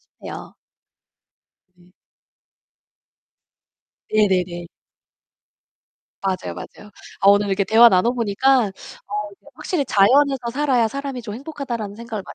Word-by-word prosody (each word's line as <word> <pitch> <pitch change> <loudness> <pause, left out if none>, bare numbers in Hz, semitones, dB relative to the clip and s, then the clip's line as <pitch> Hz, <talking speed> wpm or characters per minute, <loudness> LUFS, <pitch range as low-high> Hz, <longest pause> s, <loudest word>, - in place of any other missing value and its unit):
싶네요. - - -11 1.2
네. 175 -1 -24 2.3
네네네. 180 -4 +1 1.6
맞아요, 190 -1 -3
맞아요. 210 - -11 0.3
아 200 - +4
오늘 205 +1 +5
이렇게 195 +1 0
대화를 230 +4 +7
나눠 185 +7 +2
보니까 245 +2 +2
어 205 +1 -8
이게 200 - -23
'확실히 295 +1 -2
자연에서 260 +4 +3
살아야 260 -4 +1
사람이 275 0 -5
좀 215 -2 -7
행복하다.'라는 255 -7 -6
생각을 225 -3 -6
많이 - - -11
220 Hz, 265 characters per minute, -21 LUFS, 200-260 Hz, 2.3 s, 대화를